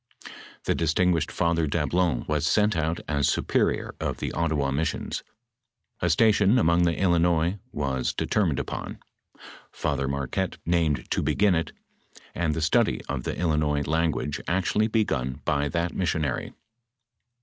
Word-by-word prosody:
The -, -, +1 dB
distinguished 85 Hz, 0 st, +1 dB
Father 85 Hz, -2 st, +1 dB
Dablon 80 Hz, -1 st, 0 dB
was 75 Hz, +1 st, 0 dB
sent 105 Hz, +4 st, +3 dB
out 80 Hz, +1 st, -1 dB
as 70 Hz, -3 st, +1 dB
superior -, -, 0 dB
of -, -, -2 dB
the -, -, -3 dB
Ottawa 75 Hz, -4 st, 0 dB
missions. 75 Hz, +4 st, -2 dB, 0.8 s
A 90 Hz, -, +1 dB
station 105 Hz, +4 st, +4 dB
among 85 Hz, -4 st, +3 dB
the 85 Hz, -1 st, +1 dB
Illinois 85 Hz, 0 st, +2 dB
was 70 Hz, -3 st, -1 dB
determined 90 Hz, -10 st, 0 dB
upon. -, -, -5 dB, 0.7 s
Father 70 Hz, -, -2 dB
Marquette 70 Hz, +7 st, -2 dB
named 80 Hz, -6 st, +1 dB
to -, -, +1 dB
begin 100 Hz, -2 st, +2 dB
it, 85 Hz, -1 st, -1 dB, 0.6 s
and 80 Hz, -3 st, -1 dB
the 80 Hz, -, -2 dB
study 75 Hz, -, +2 dB
of 65 Hz, -4 st, -4 dB
the -, -, -3 dB
Illinois 75 Hz, -4 st, +1 dB
language 80 Hz, -3 st, -1 dB
actually 95 Hz, +4 st, +1 dB
begun 70 Hz, -, -1 dB
by 70 Hz, 0 st, +1 dB
that 85 Hz, +1 st, -1 dB
missionary. 80 Hz, -7 st, -1 dB
80 Hz, 135 wpm, -26 LUFS, 75-90 Hz, 0.8 s, station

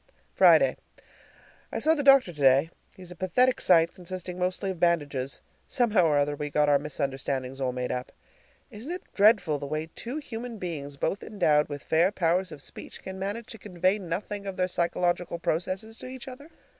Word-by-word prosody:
Friday. -, -, +5 dB, 0.9 s
I -, -, -3 dB
saw 315 Hz, -, +3 dB
the 305 Hz, -, 0 dB
doctor 275 Hz, -9 st, +5 dB
today. 140 Hz, +2 st, +3 dB, 0.3 s
He's 180 Hz, -2 st, -11 dB
a -, -, -9 dB
pathetic 250 Hz, +9 st, +2 dB
sight, 170 Hz, -1 st, +4 dB
consisting 180 Hz, 0 st, -6 dB
mostly 185 Hz, +1 st, -1 dB
of 180 Hz, -, -8 dB
bandages. 145 Hz, -6 st, 0 dB, 0.3 s
Somehow 225 Hz, -8 st, +2 dB
or 150 Hz, -2 st, +3 dB
other 145 Hz, 0 st, +1 dB
we 145 Hz, 0 st, -4 dB
got 150 Hz, 0 st, +2 dB
our 145 Hz, -1 st, +4 dB
misunderstandings 135 Hz, -2 st, -3 dB
all 130 Hz, -1 st, 0 dB
made 125 Hz, 0 st, -3 dB
up. 125 Hz, 0 st, -4 dB, 0.6 s
Isn't 235 Hz, +8 st, -8 dB
it 360 Hz, 0 st, -5 dB
dreadful 195 Hz, -8 st, +4 dB
the 140 Hz, -, -5 dB
way 155 Hz, +2 st, -4 dB
two 245 Hz, +5 st, -5 dB
human 240 Hz, -5 st, -6 dB
beings, 145 Hz, -7 st, -6 dB
both 190 Hz, -, -1 dB
endowed 155 Hz, -9 st, +1 dB
with 145 Hz, -1 st, -6 dB
fair 170 Hz, +4 st, +3 dB
powers 180 Hz, 0 st, 0 dB
of 145 Hz, -3 st, -8 dB
speech, -, -, -9 dB
can 190 Hz, 0 st, -7 dB
manage 205 Hz, +4 st, -4 dB
to 225 Hz, -, -9 dB
convey 185 Hz, +1 st, 0 dB
nothing 200 Hz, +3 st, -4 dB
of 195 Hz, -, -5 dB
their 185 Hz, -, +1 dB
psychological 175 Hz, 0 st, 0 dB
processes 185 Hz, +7 st, -3 dB
to -, -, -9 dB
each 255 Hz, -1 st, -9 dB
other? 275 Hz, +4 st, -10 dB
180 Hz, 180 wpm, -27 LUFS, 150-210 Hz, 0.9 s, Friday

